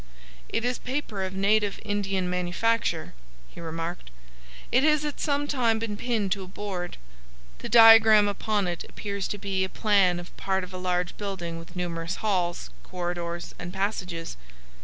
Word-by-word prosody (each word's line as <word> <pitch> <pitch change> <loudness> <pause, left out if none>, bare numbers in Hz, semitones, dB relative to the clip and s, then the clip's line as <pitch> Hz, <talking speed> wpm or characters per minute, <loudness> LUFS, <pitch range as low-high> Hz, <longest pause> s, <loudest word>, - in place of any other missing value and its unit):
"It 230 - -1
is 245 0 0
paper 250 -6 -3
of 190 0 -4
native 205 +1 +2
Indian 195 -3 -1
manufacture," 180 0 0 0.3
he - - -12
remarked. 165 - -5 0.6
"It 255 - +4
has 300 -1 +3
at 295 - -4
some 290 0 0
time 240 -6 +2
been 220 -2 -3
pinned 215 -3 -1
to 195 0 0
a - - -9
board. 185 -2 -5 0.6
The - - -6
diagram 225 -2 +8
upon 205 -1 0
it 175 -1 -3
appears 200 -2 -4
to 205 - -4
be 195 -1 -1
a 190 - -2
plan 195 -5 +3
of 175 - -11
part 190 -1 0
of 185 0 -9
a - - -5
large 180 -1 -1
building 180 -5 -4
with 165 +2 -13
numerous 170 -1 -3
halls, 175 - -1
corridors, 175 - -4
and 175 0 -6
passages. 180 - -3
195 Hz, 160 wpm, -27 LUFS, 175-215 Hz, 0.6 s, diagram